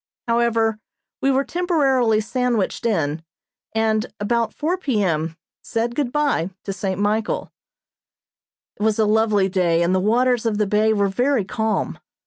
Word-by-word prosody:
However, 230 -2 +1 0.4
we 270 - +2
were 270 0 +2
temporarily 270 -11 +2
sandwiched 235 -1 -1
in, 160 -7 -1 0.5
and, 220 -1 +1
about 230 +2 0
four 320 +4 -1
P. 265 - -1
M., 160 -2 -1 0.2
said 230 +1 -2
good 255 -1 -1
bye 285 - +1
to 195 - -4
St. 195 -1 -3
Michael. 210 +2 -1 1.3
It - - -8
was 215 0 +2
a 220 - +3
lovely 210 -2 +3
day 175 -3 +2
and 175 +2 +1
the 185 - +3
waters 240 +4 +2
of 215 -2 0
the 210 - +2
bay 215 +2 +2
were 205 -2 +2
very 245 +2 +1
calm. 220 +3 -2
220 Hz, 150 wpm, -21 LUFS, 200-245 Hz, 1.3 s, a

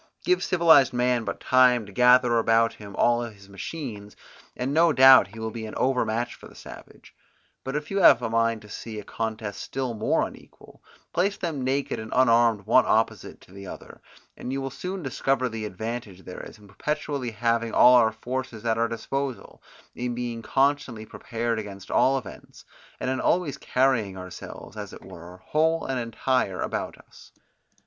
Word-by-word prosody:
Give 365 0 +2
civilized 165 -8 +5
man 125 -1 +1
but - - -4
time 125 -3 +4
to 100 - -12
gather 125 +1 +5
about 115 0 +3
him 100 -2 -11
all 120 0 +2
his 105 -4 -9
machines, 105 -1 -7 0.4
and 130 +3 -2
no 165 +2 +4
doubt 130 -2 +8
he 105 +3 -14
will 110 0 -4
be 110 0 -6
an 110 - -9
overmatch 120 -2 0
for - - -13
the - - -18
savage: - - -13 0.5
but 135 +1 -5
if 150 +3 -4
you 195 - 0
have 170 - +7
a - - 0
mind 115 -1 0
to - - -13
see 110 +1 -7
a - - -8
contest 110 -2 -5
still 130 -2 -4
more 110 -1 +1
unequal, - - -14 0.3
place 195 +4 +1
them 160 -8 -3
naked 135 0 -1
and 110 0 -8
unarmed 115 -4 +3
one - - +4
opposite - - 0
to - - -19
the 100 0 -10
other; - - -11 0.3
and 125 - -6
you 135 - -2
will 135 0 -4
soon 180 +6 -6
discover 135 0 0
the 110 -2 -5
advantage 105 -1 -6
there 90 - -8
is - - -14
in 105 -1 -18
perpetually 140 +5 -3
having 115 +1 -1
all 125 - +7
our 115 -3 +5
forces 120 0 -6
at 115 0 +1
our 115 - +2
disposal, 135 +3 -5 0.3
in 120 0 -4
being 120 -1 -4
constantly 135 -3 0
prepared 115 +1 -3
against 100 -2 -9
all 135 +1 +3
events, 130 - -10 0.3
and 130 - -2
in 130 - -2
always 165 -6 +1
carrying 125 -9 +1
ourselves, 90 -1 -10
as - - -7
it - - -12
were, 85 +2 -11
whole 160 +2 +1
and 135 -1 -2
entire 115 -3 -1
about - - -3
us. - - -18
120 Hz, 180 wpm, -25 LUFS, 110-135 Hz, 0.5 s, doubt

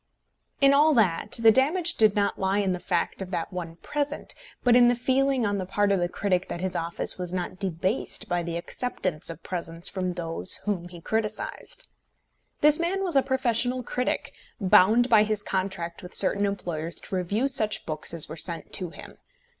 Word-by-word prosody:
In 275 0 +6
all 300 +2 +4
that 205 -3 +1
the 225 -1 +8
damage 325 - +2
did 215 -7 +3
not 200 -1 0
lie 190 +1 0
in 195 -2 +1
the 180 - -4
fact 180 +1 -2
of 190 - -5
that 180 0 -4
one 170 -2 -6
present, 290 0 -3 0.3
but 245 -1 +4
in 245 -1 +6
the 245 - +3
feeling 260 0 +1
on 205 -1 -1
the 185 - -3
part 205 +1 +1
of 195 - +2
the 175 0 -1
critic 185 -1 -1
that - - -5
his 185 0 -3
office 170 +2 -3
was 180 -1 -3
not 185 0 -4
debased 190 +4 -1
by 175 -2 -1
the 170 0 -4
acceptance 180 -4 -2
of 165 0 -9
presents 170 -1 0
from 185 -2 -3
those 170 +1 0
whom 185 -4 -2
he 175 -1 -12
criticised. 220 - -3 0.7
This 300 +1 +5
man 370 +3 -1
was 355 -5 -1
a 270 - +6
professional 255 -1 0
critic, 250 +2 -2 0.3
bound 215 +4 +5
by 225 -4 +5
his 215 -1 0
contract 185 -3 -3
with 180 - -10
certain 200 +1 +3
employers 170 -4 -4
to - - -6
review 200 +8 0
such 220 -6 0
books 155 -1 -2
as 165 -2 +3
were - - -7
sent 165 0 -2
to 180 -2 +1
him. - - -13
200 Hz, 195 wpm, -26 LUFS, 175-245 Hz, 0.7 s, the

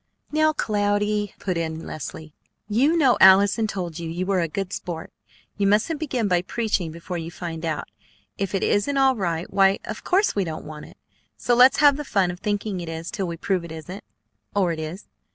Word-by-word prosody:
"Now, 310 +1 +3
Cloudy!" 205 -4 0
put 185 -3 -2
in 160 0 -4
Leslie. 155 +1 -7 0.3
"You 265 +11 +2
know 270 -6 +4
Allison 200 +4 +6
told 180 -5 -4
you 165 -1 -5
you 175 +3 -3
were 190 -1 +1
a 165 - 0
good 190 +4 -4
sport. 165 -2 -6 0.4
You 200 -1 +2
mustn't 220 +10 +2
begin 260 -8 -1
by 180 -2 +2
preaching 195 -4 -1
before 170 +2 -6
you 165 0 -5
find 170 -2 -6
out. 160 -3 -2 0.5
If 195 0 -2
it 195 - 0
isn't 275 +8 +1
all 265 -1 +4
right, 170 -5 -2
why, 195 0 +4
of - - -6
course 390 +3 +2
we 200 - +1
don't 160 -3 -6
want 150 -1 -9
it; - - -17 0.4
so 245 - +1
let's 250 +2 +6
have 285 -2 +5
the 295 - -4
fun 195 -9 +1
of 175 - -9
thinking 205 -2 -2
it 170 -2 -6
is 165 +1 -5
till 195 -3 -3
we 170 -1 -5
prove 185 +1 -1
it 170 - -9
isn't 170 +5 -8 0.5
or 190 -4 +2
it 160 - -4
is." 160 +5 -6
195 Hz, 205 wpm, -24 LUFS, 170-215 Hz, 0.5 s, Allison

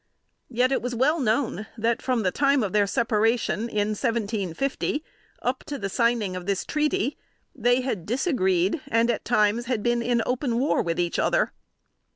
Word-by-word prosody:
Yet 250 +1 +1
it 270 - +1
was 245 0 -3
well 295 +7 +2
known 220 - 0
that, 230 +1 0
from 250 -4 0
the 185 - +1
time 275 0 +2
of 195 - -3
their 205 -1 +3
separation, 230 +1 +1
in 210 -1 0
1750, 225 - -1 0.4
up 255 +1 -1
to 285 - -4
the 195 - -3
signing 230 -3 +1
of 180 0 -6
this 200 -2 -1
treaty, 300 -3 0 0.3
they 245 +1 +2
had 220 -10 -3
disagreed 210 - +1
and, 230 +1 +2
at 230 - -3
times, 215 +3 +2
had 240 -5 -1
been 240 0 +1
in 235 -1 +1
open 250 -1 -1
war 270 +4 +2
with 170 -1 -2
each 175 -1 0
other. - - +2
235 Hz, 175 wpm, -25 LUFS, 210-255 Hz, 0.4 s, their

